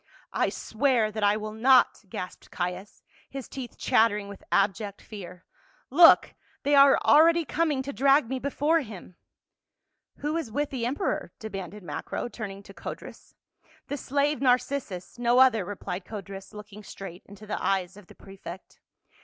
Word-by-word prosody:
" - - -31
I - - +2
swear 230 -2 0
that 215 0 -4
I 205 +1 +4
will 215 0 -5
not," 245 0 +4
gasped 180 0 -7
Caius, 180 +2 -5 0.3
his 270 -2 -7
teeth 255 -3 -8
chattering 210 -2 +2
with 200 - -11
abject 200 0 0
fear. 180 -4 -10 0.2
" - - -35
Look, 335 - +8 0.3
they 290 - +1
are 280 -1 +7
already 330 +2 +6
coming 300 -3 0
to 280 +1 -6
drag 275 -1 +4
me 260 +2 -3
before 290 +4 +1
him 205 - -9 0.5
!" - - -56
"Who 300 +3 -1
is 300 -9 -4
with 290 +5 -2
the 240 -3 -2
emperor?" 285 +10 -2
demanded 200 -2 -7
Macro, 150 +7 -4
turn 215 -4 -6
ing 195 +1 -10
to 195 - -13
Codrus. - - -9 0.3
" - - -31
The 285 - -2
slave 285 +1 0
Narcissus, 245 -6 0
no 240 0 +3
other," 255 -6 +5
replied 190 -1 -5
Codrus, 195 -1 -8
looking 210 0 -11
straight 190 -3 -9
into 205 +1 -12
the 210 - -4
eyes 190 -1 0
of 205 -3 -15
the - - -16
prefect. 190 -2 -11
220 Hz, 170 wpm, -27 LUFS, 195-270 Hz, 0.5 s, Look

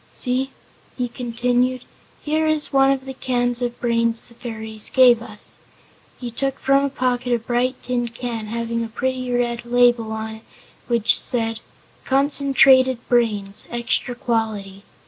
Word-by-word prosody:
See," 255 +2 0 0.5
he 250 -1 -1
continued, 245 +1 -1 0.4
"here 310 +1 0
is 310 -2 0
one 270 0 +5
of 270 -1 -2
the 265 - -6
cans 245 -1 -1
of 240 -1 -3
brains 230 -1 0
the 235 - -17
fairies 220 -3 -4
gave 250 -3 +5
us." 215 -3 -7 0.6
He 245 -2 -5
took 270 +3 -2
from 275 +1 +2
a 280 - 0
pocket 250 -2 -1
a - - +3
bright 245 +3 -1
tin 245 -1 -1
can 230 -2 -5
having 230 +1 -3
a - - -4
pretty 255 +2 -3
red 240 -1 -1
label 240 -2 +2
on 220 0 -5
it 220 - -19 0.4
which 235 -3 +3
said: 225 -2 +2 0.4
"Concentrated 270 -2 +4
Brains, 210 -5 0
Extra 240 +1 -1
Quality." 220 -6 -2
245 Hz, 145 wpm, -21 LUFS, 230-255 Hz, 0.6 s, one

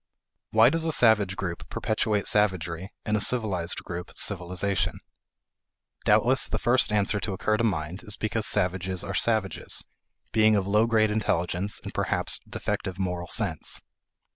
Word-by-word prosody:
Why 110 +3 +5
does 165 0 0
a 165 - 0
savage 105 -8 +4
group 85 -3 -5
perpetuate 110 -2 -1
savagery, 95 -3 0
and 105 - 0
a 105 - +1
civilized 100 -9 +1
group 90 0 -6
civilization? 95 0 0 1.1
Doubtless - - +3
the - - -2
first 125 -2 +2
answer 105 0 +1
to 100 +1 -3
occur 110 +3 0
to 115 - 0
mind 90 -2 -2
is 105 -3 -5
because 110 0 -1
savages 95 -2 0
are 100 - -5
savages; 110 -2 0 0.5
being 110 -1 +4
of 100 -2 +1
low 105 +3 +3
grade 110 -2 +3
intelligence 95 -2 0
and - - -7
perhaps - - 0
defective 95 -1 -3
moral 90 -2 -3
sense. 90 -6 -1
100 Hz, 145 wpm, -26 LUFS, 90-110 Hz, 1.1 s, Why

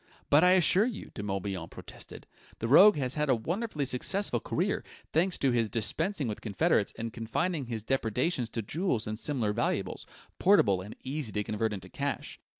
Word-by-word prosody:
"But 150 +3 +6
I 180 0 +7
assure 190 +4 +5
you!" 235 -5 -6
De - - -6
Morbihan 95 -4 -3
protested. - - -10 0.3
"The 115 - -3
rogue 195 - +8
has 130 -2 -1
had 150 -1 -1
a 130 - +5
wonderfully 160 - -2
successful 135 - -1
career, - - -1 0.3
thanks 175 +3 +2
to 135 - +2
his 115 -2 +1
dispensing 140 - -1
with 105 - -4
confederates 100 -5 +1
and 115 0 -5
confining 135 +6 -2
his 115 -3 -4
depredations 125 - 0
to 115 - -2
jewels 150 - -1
and 110 +1 -5
similar 120 -9 -1
valuables, 105 -3 -2 0.3
portable 115 - +4
and 105 +3 -9
easy 135 -3 -3
to 105 - -1
convert 110 +1 -1
into 95 -3 -6
cash. 140 +8 -4
125 Hz, 175 wpm, -29 LUFS, 110-160 Hz, 0.3 s, rogue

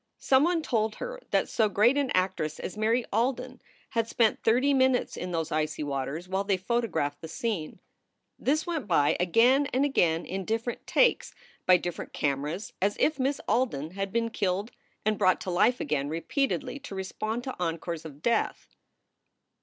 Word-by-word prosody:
Some 265 +1 +3
one 340 -2 +1
told 220 -6 0
her - - -6
that - - +2
so 220 -2 +2
great 215 +6 +4
an 285 -2 +1
actress 185 -5 0
as - - -5
Mary 225 +3 +1
Alden 250 +3 -1 0.3
had 230 -2 0
spent 230 -1 +2
thirty 255 +5 +3
minutes 260 -2 +2
in 180 - -5
those 165 -2 -2
icy 155 0 -1
waters 140 +4 -3
while 190 +1 -1
they 200 -1 +1
photographed 185 -9 -1
the 160 - -6
scene. 210 -6 -3 0.6
This 305 +4 +1
went 325 -9 -3
by 145 -6 +3
again 240 +10 +4
and 265 +3 +2
again 170 - +2
in 190 +1 -4
different 225 +4 -3
"takes" - - +2 0.3
by 185 -1 +7
different 175 -1 -6
cameras, 150 +7 -2
as 205 +2 +1
if 305 -2 +2
Miss 275 +2 0
Alden 170 - 0
had 195 +1 -4
been 230 +1 0
killed 200 +2 -1 0.3
and 215 -1 +1
brought 185 -2 +4
to 185 - -3
life 240 +8 +3
again 145 -1 -1
repeatedly 255 - -1
to 275 -8 -8
respond 215 +5 -3
to 260 - -5
encores 165 -1 -3
of 150 -2 -11
death. 235 -2 -1
215 Hz, 170 wpm, -28 LUFS, 170-250 Hz, 0.6 s, by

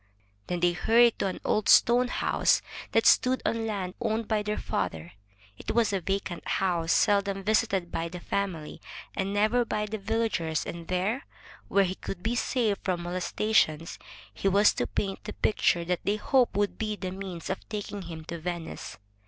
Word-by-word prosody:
Then 175 -1 -2
they 175 0 +4
hurried 230 +6 +4
to - - +1
an 185 - -4
old 210 - +1
stone 245 +1 +6
house - - +2 0.3
that - - +3
stood 255 +1 +5
on 225 0 0
land 190 -4 -3
owned 225 -1 -1
by 215 -2 +1
their 210 0 -2
father. 80 +1 -3 0.5
It - - -4
was 230 -3 +3
a 195 - 0
vacant 195 -1 -3
house, 170 -4 0
seldom 200 -1 +2
visited 205 -4 +1
by 165 - -2
the 180 +1 -7
family, 175 -4 -3 0.3
and 195 0 -1
never 215 +4 +2
by 210 -2 -2
the 215 +1 -5
villagers, 200 -7 -1
and 170 -1 -7
there, 190 +8 -1 0.4
where 200 - +3
he 185 0 -3
would 180 -2 -5
be 225 - 0
safe 230 -4 0
from 180 -2 -2
moles 175 +1 -3
tation, 165 -7 +1 0.4
he - - -2
was 200 +2 +5
to - - -2
paint 195 -1 -3
the 210 - -5
picture 175 -5 +1
that 180 0 -1
they 205 - +1
hoped 250 +4 +2
would 205 0 0
be 215 -1 -1
the 185 -3 -5
means 185 -3 -6
of 190 - -6
taking 205 -1 -5
him 165 -3 -8
to 170 0 -6
Venice. 170 0 -5
195 Hz, 185 wpm, -28 LUFS, 175-215 Hz, 0.5 s, stone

